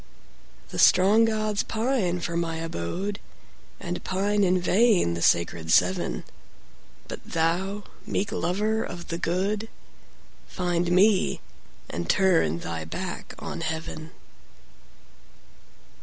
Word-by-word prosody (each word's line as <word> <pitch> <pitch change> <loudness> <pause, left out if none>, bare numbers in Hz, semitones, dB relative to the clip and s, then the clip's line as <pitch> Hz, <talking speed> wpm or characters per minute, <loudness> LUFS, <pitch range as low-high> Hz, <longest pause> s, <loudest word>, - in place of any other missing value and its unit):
The - - -5
strong 205 +5 +6
gods 215 -2 0
pine 220 -7 -1
for 170 0 -3
my 170 -1 -1
abode, 165 - -4 0.6
And 175 -1 -5
pine 205 +2 +1
in 185 -1 +3
vain 190 - +3
the 85 - -4
sacred 85 -1 +2
Seven; 90 -10 +2 0.8
But - - -7
thou, 180 +5 -1 0.2
meek 200 - -1
lover 215 +5 0
of 175 0 -8
the 170 - -3
good! 200 +6 -1 0.8
Find 175 -1 -1
me, 195 +2 +4 0.5
and 85 0 -5
turn 165 - +3
thy 85 -1 -4
back 80 - -6
on - - -6
heaven. 160 0 -4
180 Hz, 110 wpm, -26 LUFS, 160-205 Hz, 0.8 s, strong